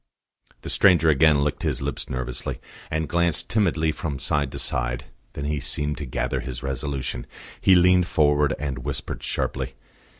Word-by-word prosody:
The - - -6
stranger 90 -5 +5
again 75 0 +4
licked 75 0 -2
his 75 -6 -1
lips 70 +1 -4
nervously, 65 -1 -4 0.3
and 80 0 -1
glanced 85 +2 +1
timidly 85 -7 +2
from 75 -2 -4
side 70 0 0
to - - -4
side. 60 +2 0 0.3
Then 70 - -5
he 75 0 -1
seemed 75 +2 -2
to 75 - -5
gather - - -1
his 65 -1 -5
resolution; 70 -2 -3 0.3
he 95 - +6
leaned 90 0 +5
forward 75 -1 +3
and 70 -1 -3
whispered 60 - -4
sharply. 65 - -2
75 Hz, 160 wpm, -24 LUFS, 65-80 Hz, 0.3 s, he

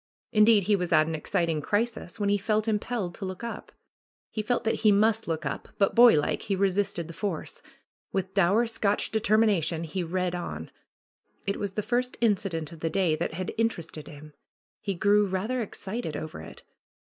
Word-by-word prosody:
Indeed 215 -1 +5
he 205 +3 +3
was 180 -2 -2
at 155 -1 +5
an 160 - -3
exciting 165 -1 -1
crisis, 215 -1 -2
when 205 -1 +1
he 205 - +3
felt 215 +2 0
im 215 -2 +2
pelled 210 -7 -3
to - - -9
look 185 +3 -6
up. 235 - -6 0.6
He 215 - -2
felt 240 +3 0
that 225 - 0
he 215 -2 +6
must 220 +2 +3
look 160 -2 -2
up, 135 - -4
but 195 - +2
boylike 235 -11 +5
he 195 - -1
resisted 195 -3 0
the 170 - -8
force. 180 -1 -4 0.5
With 190 -1 -2
dour 200 +4 +3
Scotch 210 -3 0
deter 215 -1 +2
mination 170 -7 +2
he 165 +4 -3
read 180 +1 -1
on. 80 - -5 0.7
It 200 - -1
was 200 -2 -3
the 210 - -2
first 250 +2 -1
incident 195 -8 0
of 165 - -11
the 165 - -1
day 175 -3 +2
that 160 - -3
had 185 +1 -4
interested 170 -9 -2
him. 150 0 -12 0.5
He 200 -2 -2
grew 205 +2 +3
rather 215 +7 -1
excited 210 -3 -4
over 155 - -6
it. - - -11
195 Hz, 190 wpm, -27 LUFS, 170-215 Hz, 0.7 s, he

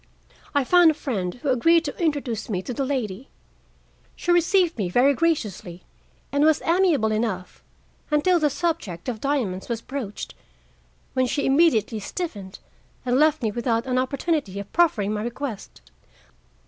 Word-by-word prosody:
I 285 - +3
found 350 +4 +6
a 310 - +1
friend 195 -12 -3
who 275 +3 -4
agreed 330 +7 +4
to 285 - -4
introduce 270 -9 -1
me 190 -3 -2
to 250 - -5
the 275 - -2
lady. 255 -4 -3 0.9
She 350 - -1
received 350 0 +3
me 190 -4 -1
very 255 +9 +4
graciously 215 - -2 0.5
and 285 +1 +2
was 310 0 +4
amiable 330 - +3
enough 215 -4 -3 0.5
until 330 +4 +3
the 300 -2 +2
subject 265 - -3
of 230 -4 -4
diamonds 245 -10 -1
was 235 -2 -1
broached, 240 -4 -6 0.8
when 255 -1 +1
she 285 +3 -1
immediately 270 -7 +3
stiffened 205 - -6 0.5
and 250 +1 +2
left 310 -2 +3
me 220 - +1
without 230 +1 -1
an 255 -1 0
opportunity 260 - -1
of 200 - -9
proffering 225 - +2
my 210 - -2
request. 240 -1 -6
255 Hz, 150 wpm, -24 LUFS, 215-310 Hz, 0.9 s, found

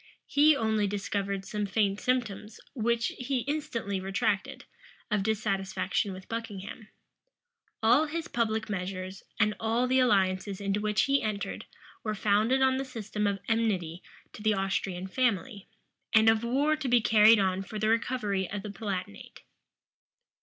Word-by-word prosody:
He 300 +2 +5
only 220 -4 +1
discovered 200 -1 -2
some 210 0 -3
faint 200 0 +1
symptoms, 225 -4 -2
which 235 -2 0
he 250 0 -1
instantly 240 -7 -3
retracted, 195 +1 -1 0.5
of 210 -1 +2
dissatisfaction 195 -2 -1
with 185 0 -9
Buckingham. 220 -1 -6 1.0
All 250 +8 +5
his 330 +2 -4
public 220 -4 -1
measures, 185 -1 -4 0.2
and 210 -1 +3
all 225 +3 +1
the 260 +1 +3
alliances 195 -5 +2
into 200 0 -1
which 210 0 +1
he 275 0 +2
entered, 210 -2 -3 0.4
were 215 -1 -2
founded 215 +6 +2
on 260 0 +3
the 270 - -1
system 215 -5 -3
of 200 -1 0
enmity 190 -7 0 0.3
to - - -10
the 215 0 +2
Austrian 190 -1 -2
family, 220 0 -1 0.5
and 220 0 +7
of 225 0 +2
war 280 +6 +2
to 305 -3 -4
be 245 -1 +5
carried 220 0 +6
on 190 -1 +1
for 195 +3 -7
the 215 +1 0
recovery 220 -5 0
of 200 -1 -5
the 210 - -5
Palatinate. 195 - -6
215 Hz, 145 wpm, -29 LUFS, 195-235 Hz, 1.0 s, and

